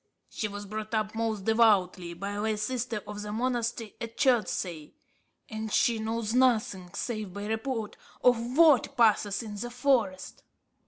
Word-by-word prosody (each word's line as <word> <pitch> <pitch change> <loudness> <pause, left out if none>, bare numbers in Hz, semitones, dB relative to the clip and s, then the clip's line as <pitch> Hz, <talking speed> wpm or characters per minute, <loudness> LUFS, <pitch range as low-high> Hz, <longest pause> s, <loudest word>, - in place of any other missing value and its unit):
She 215 - -2
was 205 0 -7
brought 215 +2 -4
up 215 -1 -1
most 220 -3 -2
devoutly, 195 -6 +3
by 200 +4 -5
a 205 0 -3
lay 220 0 0
sister 230 0 -3
of 210 0 -6
the 210 0 -5
monastery 235 -1 -2
at 230 -1 -6
Chertsey; 200 - 0 0.5
and 220 -1 -5
she 230 +1 +2
knows 220 0 -2
nothing, 230 -8 +2
save 215 -5 -3
by 205 0 -5
report, 220 0 -3 0.3
of 245 +1 +2
what 295 -4 +5
passes 215 -2 +3
in 210 -2 -7
the 240 +4 -4
forest." 240 -7 0
220 Hz, 155 wpm, -28 LUFS, 205-240 Hz, 0.5 s, what